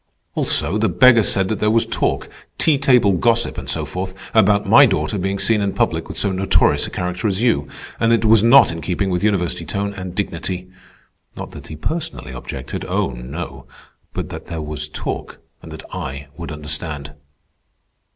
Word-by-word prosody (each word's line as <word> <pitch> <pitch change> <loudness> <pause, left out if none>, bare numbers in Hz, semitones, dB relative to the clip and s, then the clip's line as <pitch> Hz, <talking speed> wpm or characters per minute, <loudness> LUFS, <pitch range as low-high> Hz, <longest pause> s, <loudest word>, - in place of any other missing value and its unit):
"Also, 95 +8 -1
the 110 -1 +2
beggar 120 +5 +6
said 95 -2 +2
that 110 - -2
there 105 - +2
was 115 +1 +3
talk, 115 - -1 0.3
tea 150 -4 +3
table 125 -7 +4
gossip 115 +5 +2
and - - -6
so - - 0
forth, 95 +1 -5 0.2
about 105 -1 +4
my 135 +8 +7
daughter 105 +1 -1
being 95 +2 -1
seen 110 +1 +2
in 100 -1 -1
public - - 0
with - - -7
so 100 - +2
notorious 95 +1 +2
a - - -6
character 90 +2 -3
as 100 +2 0
you, 75 - +2 0.3
and 115 0 +3
that 115 -1 +3
it - - +3
was 110 -1 +6
not 130 0 +7
in 85 0 -6
keeping 95 +3 -1
with 90 +1 -1
university 90 -5 0
tone 100 +5 -3
and 95 -2 -7
dignity. 90 -2 -3 0.7
Not - - -7
that - - -11
he 80 - -8
personally 160 - -4
objected—oh, 65 +2 -3
no; 65 +2 -7 0.4
but - - -5
that - - -8
there 85 -1 -5
was 75 -2 -5
talk - - -5 0.2
and - - -11
that - - -9
I 70 +2 -6
would 85 0 -7
understand." 75 -1 -4
95 Hz, 185 wpm, -20 LUFS, 85-110 Hz, 0.7 s, my